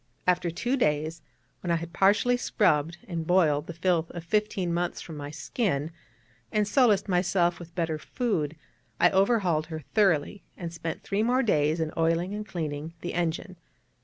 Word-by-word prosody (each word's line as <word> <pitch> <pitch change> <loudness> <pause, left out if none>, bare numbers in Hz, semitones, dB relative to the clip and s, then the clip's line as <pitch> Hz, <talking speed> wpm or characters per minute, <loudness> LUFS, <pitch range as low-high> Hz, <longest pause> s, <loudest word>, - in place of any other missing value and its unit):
After 180 -1 +2
two 245 +11 -1
days, 155 - 0 0.4
when 175 - -5
I 170 - +3
had 170 0 -5
partially 205 +6 +4
scrubbed 170 -9 +1
and 165 -4 -4
boiled 160 -5 +3
the 170 - -5
filth 170 -1 +1
of 175 - -7
fifteen 190 -1 0
months 175 +1 -1
from 160 - -8
my 145 -1 -6
skin, 155 - -2 0.6
and 210 -1 +1
solaced 215 -5 +3
myself 175 -1 +2
with 170 -1 -11
better 165 -3 -1
food, 165 - -2 0.4
I 175 - +5
overhauled 190 -6 +2
her 160 -1 -6
thoroughly, 195 -3 +2 0.2
and 170 -2 -6
spent 165 -1 -5
three 200 +1 0
more 250 +4 +2
days 155 -6 +2
in 160 -1 -2
oiling 165 +3 +1
and 210 0 -5
cleaning 155 -2 -4
the 175 - -4
engine. 175 +2 -2
175 Hz, 165 wpm, -27 LUFS, 160-195 Hz, 0.6 s, I